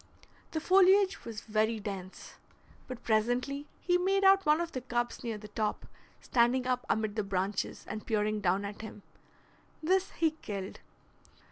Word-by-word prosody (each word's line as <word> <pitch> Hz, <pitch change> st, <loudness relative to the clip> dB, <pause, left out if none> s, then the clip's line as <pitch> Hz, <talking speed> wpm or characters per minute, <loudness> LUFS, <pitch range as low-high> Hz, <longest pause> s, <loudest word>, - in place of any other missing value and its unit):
The 320 Hz, -, -2 dB
foliage 380 Hz, +3 st, +4 dB
was 225 Hz, -2 st, -6 dB
very 220 Hz, +1 st, 0 dB
dense, 195 Hz, -2 st, -7 dB, 0.5 s
but 255 Hz, -3 st, -8 dB
presently 245 Hz, +6 st, 0 dB
he 355 Hz, 0 st, +2 dB
made 390 Hz, +2 st, +2 dB
out 390 Hz, -2 st, +5 dB
one 300 Hz, +1 st, +5 dB
of 340 Hz, -1 st, -2 dB
the 255 Hz, -, -4 dB
cubs 240 Hz, -1 st, -2 dB
near 230 Hz, -3 st, -3 dB
the 210 Hz, 0 st, -11 dB
top, 210 Hz, 0 st, -2 dB, 0.3 s
standing 250 Hz, +1 st, +2 dB
up 250 Hz, 0 st, -1 dB
amid 215 Hz, -1 st, 0 dB
the 215 Hz, -, 0 dB
branches, 195 Hz, +1 st, -2 dB
and 215 Hz, 0 st, -5 dB
peering 215 Hz, -1 st, 0 dB
down 190 Hz, +1 st, +1 dB
at 205 Hz, +1 st, -7 dB
him. 210 Hz, -2 st, -9 dB, 0.8 s
This 375 Hz, +3 st, +2 dB
he 325 Hz, -2 st, +2 dB
killed. 200 Hz, -2 st, -5 dB
235 Hz, 155 wpm, -31 LUFS, 210-315 Hz, 0.8 s, out